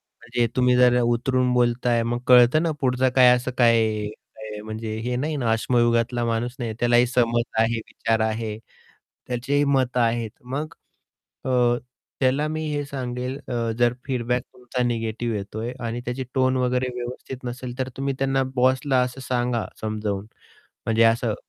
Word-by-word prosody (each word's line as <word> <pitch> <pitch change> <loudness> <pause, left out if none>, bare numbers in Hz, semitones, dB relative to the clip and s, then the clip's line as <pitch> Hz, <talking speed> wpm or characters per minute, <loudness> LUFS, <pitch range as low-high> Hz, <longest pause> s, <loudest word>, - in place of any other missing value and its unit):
म्हणजे 120 0 -3
तुम्ही 125 -1 +4
जर 125 0 +5
उतरून 125 +2 +1
बोलताय 120 -1 +2
मग 120 +1 -1
कळतं 125 +4 +6
ना 170 - +1
पुढचं 130 -1 +2
काय 125 -1 +8
असं 125 +1 -3
काय 115 -2 +5 0.6
आहे 110 -1 -7
म्हणजे 110 0 -5
हे 125 0 -1
नाही 150 +4 -1
ना, 120 -5 0
अश्मयुगातला 120 +1 +1
माणूस 115 +1 -1
नाही. 120 -3 -3
त्यालाही 120 0 +4
समज 120 -1 +2 0.2
आहे, 115 +1 +2
विचार 115 0 -2
आहे. 110 -1 -1 0.7
त्याचीही 130 +4 0
मतं 130 -3 +1
आहेत. 115 -1 +1
मग 140 +5 -4 0.7
अ, - - -1 0.7
त्याला 135 +3 +2
मी 155 0 -3
हे 145 0 -1
सांगेल 125 -1 -4
अ, 115 -2 -1
जर 120 0 +3
फीडबॅक 125 -2 -1
तुमचा 125 0 -3
निगेटिव्ह 115 -1 -1
येतो 100 +1 -6
आहे 120 +2 -3
आणि 115 +1 -3
त्याची 125 +2 -3
टोन 130 0 +2
वगैरे 125 0 +1
व्यवस्थित 125 +1 -6
नसेल, 125 0 -6
तर 130 -1 -1
तुम्ही 135 0 -1
त्यांना 135 0 +1
बॉसला 130 +1 +2
असं 125 +1 -4
सांगा 125 -2 -1 0.2
समजावून, 105 -2 -3 0.6
म्हणजे 115 0 +3
असं 115 -1 +2
125 Hz, 155 wpm, -24 LUFS, 115-130 Hz, 0.7 s, काय